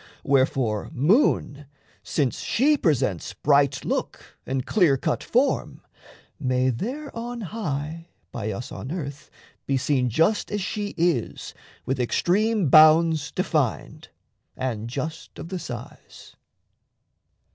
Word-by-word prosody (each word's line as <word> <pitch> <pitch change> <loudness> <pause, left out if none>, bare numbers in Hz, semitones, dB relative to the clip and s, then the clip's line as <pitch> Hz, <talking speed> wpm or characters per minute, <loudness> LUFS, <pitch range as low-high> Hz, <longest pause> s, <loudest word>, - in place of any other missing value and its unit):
Wherefore, 130 -5 +1
moon, 150 - +2 0.3
Since 140 -5 -1
she 290 +6 +2
presents 130 - 0
bright 140 -2 +2
look - - -4
and 130 -1 -2
clear 175 -10 +3
cut - - -2
form, 260 +4 0 0.6
May 130 -1 +1
there 260 - -5
on 235 +1 -5
high 165 -5 -4 0.2
by 110 -2 -4
us 115 +5 -6
on 130 - -7
earth 145 -5 -6 0.4
be 135 - +1
seen 130 -1 +1
Just 165 - +1
as 205 - -1
she 205 +1 -4
is 165 -9 -1 0.3
with 130 0 -1
extreme 200 - +1
bounds 155 0 +6
defined, - - -2 0.5
And 115 -4 -3
just 155 +6 -6
of 165 - -8
the 185 -1 -4
size. 120 -8 -10
150 Hz, 115 wpm, -24 LUFS, 130-190 Hz, 0.6 s, bounds